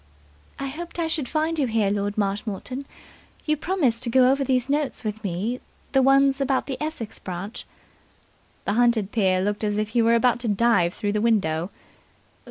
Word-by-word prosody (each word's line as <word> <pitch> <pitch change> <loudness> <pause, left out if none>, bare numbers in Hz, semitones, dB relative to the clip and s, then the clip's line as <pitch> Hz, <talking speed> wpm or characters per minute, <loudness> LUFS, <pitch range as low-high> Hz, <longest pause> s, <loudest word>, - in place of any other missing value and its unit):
"I 275 - -4
hoped 330 +6 -6
I 335 - 0
should 315 -5 -2
find 315 +1 0
you 275 - +2
here, 220 -3 +1
Lord 205 0 -2
Marshmoreton. 210 +6 -3 0.6
You 305 - +2
promised 295 -8 0
to 250 - -1
go 255 +1 +5
over 275 +1 +1
these 255 -1 +1
notes 285 -2 -1
with 215 0 -4
me, 205 +7 -2 0.3
the 270 - +4
ones 275 +1 +4
about 270 -1 +1
the 270 0 -5
Essex 305 -8 -5
branch 185 +4 -6 0.5
" - - -36
The - - 0
hunted 230 -3 +2
peer 190 -4 +2
looked 205 +2 -1
as 210 -1 0
if 215 0 -1
he 235 +1 +2
were 230 +1 +4
about 240 0 +3
to 240 - -3
dive 205 -5 +2
through 205 - -1
the 210 0 0
window. 185 -7 +1
235 Hz, 185 wpm, -24 LUFS, 205-275 Hz, 0.6 s, go